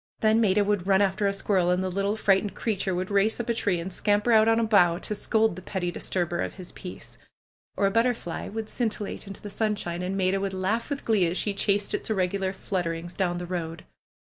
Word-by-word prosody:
Then 220 +1 +4
Maida 205 -1 +3
would 200 -3 0
run 195 -1 +5
after 195 +1 +1
a - - +2
squirrel 195 -2 +1
and 180 +1 +2
the 185 - -2
little 200 +3 0
frightened 200 -1 +2
creature 195 -4 -1
would 185 +2 -3
race 200 +3 +2
up 240 0 -3
a - - +3
tree 200 -6 0
and 180 +2 -5
scamper 205 +4 +1
out 220 -1 +6
on 225 0 +4
a - - +2
bough 180 -6 +4
to 205 - -4
scold 220 -1 +1
the 185 - -8
pretty 180 -2 -3
disturber 175 -1 -1
of - - -3
his 185 -2 -9
peace. 180 - -10 0.6
Or 200 - +2
a 195 - +3
butterfly 230 -5 0
would 220 +1 -4
scintillate 220 -4 -3
into 195 - -9
the 205 - -6
sunshine, 205 -5 -1
and 185 +2 -2
Maida 190 0 +1
would 195 -1 -2
laugh 205 +7 -1
with 285 -1 -4
glee 205 -6 +3
as 170 +3 -2
she 205 - 0
chased 200 +1 0
its - - -2
irregular 190 -1 0
flutterings 175 -3 -3
down 175 -2 0
the 175 - -4
road. 170 -2 -5
195 Hz, 225 wpm, -26 LUFS, 180-215 Hz, 0.6 s, out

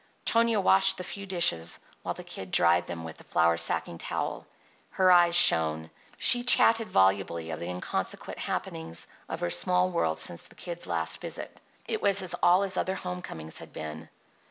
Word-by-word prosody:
Tonia 230 -1 +2
washed 95 - +4
the 185 - -5
few 200 +2 -8
dishes 170 - +1 0.2
while - - -4
the - - -9
Kid 95 -1 -8
dried 85 0 +3
them 85 -1 -7
with 80 -1 -9
the - - -13
flour 85 0 +1
sacking 85 0 0
towel. - - -4 0.4
Her 185 -1 +2
eyes 175 -1 +5
shone; 80 - +5 0.3
she 245 - +5
chatted 230 -2 +4
volubly 95 -4 +1
of 80 - -6
the 85 - -5
inconsequent 90 0 -4
happenings 80 0 -4 0.2
of - - -6
her 85 - -2
small 90 +1 +1
world 80 -1 -1
since 85 +1 -2
the - - -20
Kid's 175 -1 -8
last 80 -2 -2
visit; - - -7 0.3
it - - -2
was 200 -1 +1
as 185 - -2
all 180 +3 +4
his 195 -1 -2
other 190 - -1
home 180 -1 -5
comings 80 - -6
had - - -13
been. 80 +1 -8
90 Hz, 180 wpm, -27 LUFS, -, 0.4 s, eyes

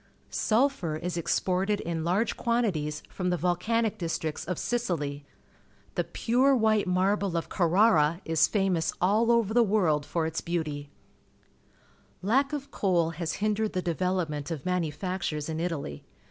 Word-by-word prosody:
Sulphur 220 - +1
is 175 +3 -4
exported 185 +4 0
in 165 -1 -3
large 185 +7 +1
quantities 180 -11 -1
from 180 -1 -3
the 180 - +1
volcanic 210 +6 0
districts 165 -2 -3
of 180 -1 -3
Sicily. 150 -12 -2 0.7
The - - 0
pure 260 +3 +2
wliite 215 -3 +2
marble 190 0 +1
of 165 - -3
Carrara 170 -3 +3
is 160 -1 +3
famous 195 -5 +1
aU 210 +6 +3
over 230 -3 +3
the 240 - +5
world 185 -9 +2
for 165 +1 -1
its 160 +1 -2
beautj\ 155 -4 -3 1.4
Lack 270 +8 +2
of 285 -1 -5
coal 175 -4 +1
has 165 0 -3
hindered 215 +1 0
the 185 -1 -1
de^'elop 180 +1 0
ment 145 0 -5
of 155 -5 -5
manufactures 175 -2 -2
in 160 0 -3
Italy. 165 - -3
180 Hz, 145 wpm, -28 LUFS, 160-215 Hz, 1.4 s, the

